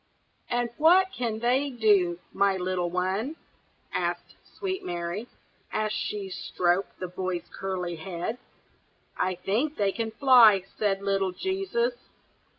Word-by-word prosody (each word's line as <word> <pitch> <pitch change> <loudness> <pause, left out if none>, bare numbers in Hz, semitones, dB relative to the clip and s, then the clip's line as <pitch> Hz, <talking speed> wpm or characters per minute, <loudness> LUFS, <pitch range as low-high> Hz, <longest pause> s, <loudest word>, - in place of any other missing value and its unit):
"And 240 -1 0
what 365 +4 +5
can 230 -3 -2
they 250 +5 +1
do, 205 -8 +3 0.2
my 200 -1 +2
little 180 -1 -1
one?" 190 - -1 0.6
asked - - -2 0.2
sweet 380 -2 -3
Mary, 175 +5 -4 0.4
as 215 0 0
she 205 -2 -3
stroked 180 0 -1
the 185 - -3
boy's 180 0 -4
curly 180 -3 -3
head. 175 +7 -4 0.8
"I 185 0 0
think 245 - -1
they 200 -2 +2
can 225 +2 -3
fly!" 225 -5 +6 0.2
said 200 -2 +1
little 195 -2 +1
Jesus. 390 - -1
200 Hz, 125 wpm, -27 LUFS, 185-245 Hz, 0.8 s, fly